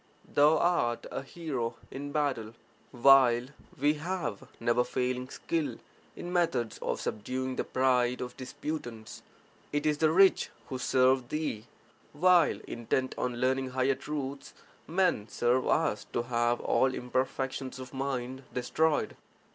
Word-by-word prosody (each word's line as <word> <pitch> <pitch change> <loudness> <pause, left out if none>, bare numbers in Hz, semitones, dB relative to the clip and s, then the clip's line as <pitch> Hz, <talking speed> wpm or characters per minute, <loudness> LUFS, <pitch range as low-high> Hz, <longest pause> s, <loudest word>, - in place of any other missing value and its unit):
Thou 150 +2 +4
art 150 -9 +1
a - - -3
hero 135 -6 -4 0.2
(in 145 +1 -6
battle), 130 -7 -1 0.3
while 125 -1 +5 0.3
we 145 +2 +4
have 175 - -3
never 120 +1 +2
failing 125 +1 -2
skill 160 +1 -2 0.4
in 175 +1 -6
methods 135 -10 0
of - - -2
subduing 130 +4 -3
the - - -1
pride 125 -1 +2
of 125 - -5
disputants. 125 -4 -6 0.5
It 145 +1 -1
is 150 -1 +1
the 160 - +4
rich 190 +3 +5 0.2
who 130 - -4
serve 130 -1 +3
thee, 150 -8 -3 0.5
while, 175 +2 +4
intent 125 +3 -2
on 125 -1 -2
learning 130 +1 +1
(higher 130 +1 +2
truths), 140 -1 -5 0.3
men 175 - +1
serve 120 +3 +1
us 150 -10 +1
to 120 - 0
have 120 0 +1
all 130 0 +2
imperfections 130 +1 -2
of 130 0 -9
mind 130 -1 -3
destroyed. 150 +5 0
130 Hz, 130 wpm, -30 LUFS, 125-150 Hz, 0.5 s, while